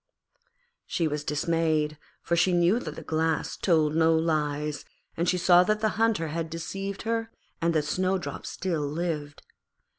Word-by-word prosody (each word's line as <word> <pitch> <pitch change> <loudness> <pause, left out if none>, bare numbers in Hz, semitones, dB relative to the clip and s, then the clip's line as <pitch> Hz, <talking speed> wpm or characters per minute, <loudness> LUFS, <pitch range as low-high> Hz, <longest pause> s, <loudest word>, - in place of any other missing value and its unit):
She 165 - 0
was 150 -1 -3
dismayed, 155 0 0 0.2
for 170 - +1
she 180 +2 +3
knew 175 +6 +3
that - - -6
the - - -8
Glass 160 0 -1
told 155 -4 +2
no 165 0 +4
lies, 150 -2 -1 0.3
and 170 +1 0
she 180 - +2
saw 180 0 +6
that 215 +1 +1
the 215 - +3
Hunter 220 -8 +1
had 165 +1 -3
deceived 195 +4 -5
her 225 0 -1 0.3
and 170 0 +2
that 150 -1 +2
Snowdrop 185 +4 -2
still 175 -5 -2
lived. 150 -1 -3
165 Hz, 155 wpm, -27 LUFS, 155-185 Hz, 0.3 s, saw